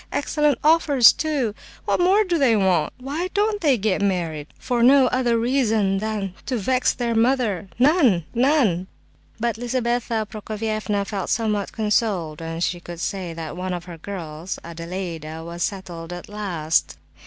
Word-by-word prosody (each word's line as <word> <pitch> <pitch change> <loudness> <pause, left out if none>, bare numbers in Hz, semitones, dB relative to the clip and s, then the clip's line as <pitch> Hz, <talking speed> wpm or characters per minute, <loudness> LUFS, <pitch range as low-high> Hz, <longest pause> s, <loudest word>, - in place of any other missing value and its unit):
Excellent 295 -1 +1
offers, 300 -5 +6
too! 285 -8 -1 0.3
What - - +1
more 380 +4 +4
do 350 -4 0
they 255 -5 +4
want? 185 -7 +2
Why 285 +8 -3
don't 415 0 +1
they 285 -6 +3
get 205 -2 0
married? 170 -7 -1
For 245 -1 -1
no 265 +2 +6
other 245 -2 +1
reason 225 -5 +1
than 210 -3 -3
to 255 - 0
vex 255 +5 +1
their 235 -2 -2
mother—none—none!" 235 - +2 0.5
But 235 0 -1
Lizabetha 240 -2 -1
Prokofievna 215 -1 -3
felt 195 -2 -4
somewhat 210 -3 0
consoled 210 -8 0
when 165 0 -5
she 175 0 0
could 175 -1 -9
say 185 -1 -3
that 160 -1 -6
one 185 +1 -3
of 175 - -7
her 170 -2 -10
girls, 170 -2 -6
Adelaida, 165 -2 -6
was 170 +1 -7
settled 175 -4 -4
at 175 0 -7
last. 180 -7 -1
210 Hz, 145 wpm, -23 LUFS, 175-250 Hz, 0.5 s, offers